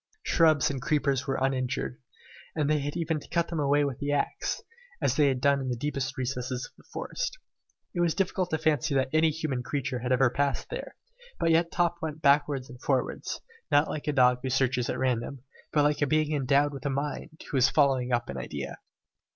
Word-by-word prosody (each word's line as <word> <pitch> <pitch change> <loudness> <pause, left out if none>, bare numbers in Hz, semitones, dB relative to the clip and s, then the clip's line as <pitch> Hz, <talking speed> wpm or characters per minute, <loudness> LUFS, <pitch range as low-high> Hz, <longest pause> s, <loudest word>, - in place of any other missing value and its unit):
Shrubs 155 -5 +4
and 135 -2 -4
creepers 140 -1 +1
were 135 - 0
uninjured, 130 -1 -1 0.5
and 150 -3 +1
they 150 0 +2
had 145 +2 -3
even 160 -2 0
to - - -14
cut 170 -1 0
them 165 - -2
away 145 0 +3
with 140 -3 -4
the 145 0 -1
axe, 145 - -1 0.4
as - - +1
they 150 -2 +4
had 130 -2 +1
done 140 +1 +3
in 130 - -3
the 125 - 0
deepest 135 +1 -3
recesses 125 0 -2
of - - -13
the - - -22
forest. - - -3 0.6
It 175 - -3
was 170 -2 +2
difficult 185 -1 0
to 160 - 0
fancy 155 -2 +1
that 130 -1 +2
any 160 0 +4
human 155 -5 -2
creature 130 -1 -2
had 125 +2 -3
ever 130 -1 +4
passed 140 +1 -1
there, - - -6 0.4
but 165 - +2
yet 165 +1 +3
Top 175 -1 +1
went 155 -1 -4
backwards 140 -2 +3
and 125 0 -12
forwards, 135 -3 -1 0.3
not 145 +2 +4
like 150 - -5
a - - +3
dog 125 -2 +4
who 130 - -2
searches 125 -1 +1
at - - -1
random, 130 0 -1 0.3
but 150 - +3
like 150 0 +2
a 145 - +3
being 155 +1 +2
endowed 140 +1 +2
with 140 +1 -4
a - - 0
mind, 145 +3 -4
who 140 - +1
is 130 0 +5
following 135 -4 +2
up 120 -1 +1
an 70 - -5
idea. 65 - -5
140 Hz, 215 wpm, -28 LUFS, 130-155 Hz, 0.6 s, is